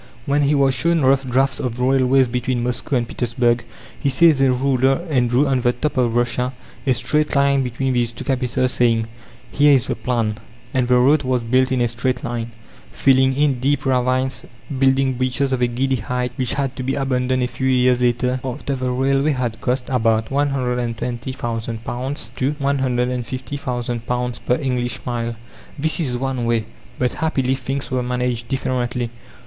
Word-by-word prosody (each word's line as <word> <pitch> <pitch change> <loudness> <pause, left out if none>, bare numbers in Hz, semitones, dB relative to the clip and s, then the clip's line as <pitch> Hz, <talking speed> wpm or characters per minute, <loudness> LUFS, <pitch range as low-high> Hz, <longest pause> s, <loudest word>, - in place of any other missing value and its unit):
When 145 +1 +2
he 145 +1 +3
was 135 -1 +3
shown 165 +5 +1
rough 135 0 +3
drafts 130 +1 +1
of 125 -1 -3
railways 130 0 +3
between 125 0 -1
Moscow 125 +3 -2
and 120 -2 0
Petersburg, 120 0 0 0.4
he 140 - +1
seized 150 +1 +4
a 135 -1 +4
ruler 135 +4 +1
and 125 -4 +2
drew 125 +5 +3
on 135 -2 +1
the 120 - +3
map 150 +2 -1
of 120 -3 +1
Russia 125 +1 0 0.3
a 130 - +5
straight 150 +5 0
line 140 0 +3
between 130 +1 -1
these 120 -2 +1
two - - -8
capitals, 130 -1 0
saying, 115 -3 +2 0.5
"Here 145 0 +5
is 130 - +2
the - - -2
plan." 115 -4 -1 0.3
And 130 -2 +1
the 125 - +4
road 140 +4 +4
was 130 -2 0
built 130 +3 +2
in 130 -1 +1
a 120 - +3
straight 125 +2 -2
line, 120 -1 -3 0.4
filling 130 -1 +3
in 140 -3 +2
deep 140 +3 0
ravines, 130 0 0 0.3
building 135 0 +3
bridges 130 +1 0
of 125 - -1
a 125 - +4
giddy 130 +2 0
height, 125 +2 -2
which 130 +1 -1
had 135 -2 -2
to - - -3
be 130 +1 -1
abandoned 130 -2 0
a - - +1
few 130 +1 -3
years 125 -1 +3
later, 125 +1 +1
after 135 +2 -3
the 130 -1 -2
railway 135 +3 +1
had 120 -3 -3
cost 125 0 -1
about 115 -3 +1
£120,000 125 -2 -3
to 130 +2 +1
£150,000 125 -2 -2
per 125 - +4
English 125 -3 -2
mile. 120 -1 -2 0.4
This 155 +4 +1
is 130 -7 -1
one 130 -2 -2
way, 115 -2 +1 0.3
but 125 -1 0
happily 135 -5 +1
things 135 +1 -4
were 130 -1 0
managed 125 -1 -2
differently. 125 -3 -2
130 Hz, 175 wpm, -20 LUFS, 120-135 Hz, 0.5 s, a